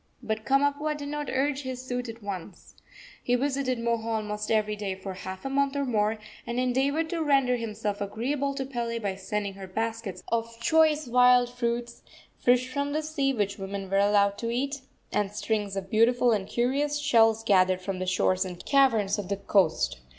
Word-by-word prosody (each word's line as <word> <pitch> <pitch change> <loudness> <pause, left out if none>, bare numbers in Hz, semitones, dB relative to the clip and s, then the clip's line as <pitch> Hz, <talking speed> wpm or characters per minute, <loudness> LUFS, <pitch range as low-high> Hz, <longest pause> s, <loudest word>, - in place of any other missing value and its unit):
But 220 -1 -3
Kamapuaa 285 +2 +1
did 285 -1 -6
not 295 -1 -3
urge 275 +1 0
his 255 -1 -6
suit 245 -1 -3
at 225 -1 -9
once. 190 -2 -7 0.5
He 245 - +2
visited 265 -1 0
Moho 230 -1 -1
almost 210 -2 -3
every 215 -1 +1
day 200 -2 -3
for 190 0 -7
half 185 +2 -8
a - - 0
month 280 0 +1
or 280 0 0
more, 220 -3 +1 0.3
and 235 +1 -2
endeavored 270 +5 +1
to 335 -2 -1
render 270 -4 +3
himself 215 -3 -3
agreeable 270 +7 -2
to 270 -1 -3
Pele 235 -3 -3
by 205 -4 -2
sending 200 +1 -3
her 195 -1 -9
baskets 225 0 -4
of 230 0 -2
choice 310 +3 +3
wild 250 0 +5
fruits, 235 -1 -3 0.4
fish 250 +1 +3
from 280 +2 -2
the 310 +1 -1
sea 295 -3 0
which 205 -5 -2
women 195 0 -5
were 195 - +3
allowed 200 0 +3
to 230 - -2
eat, 275 +4 -2 0.3
and 205 -1 0
strings 210 -2 -2
of 195 -1 -5
beautiful 240 +2 +4
and 200 -3 0
curious 280 +6 0
shells 225 -6 +3
gathered 185 -3 +3
from 190 -1 -3
the 185 - -3
shores 185 +1 +2
and 180 -2 -8
caverns 225 -7 +3
of 195 -3 -5
the 200 - -1
coast. 160 - +1
230 Hz, 185 wpm, -27 LUFS, 205-270 Hz, 0.5 s, wild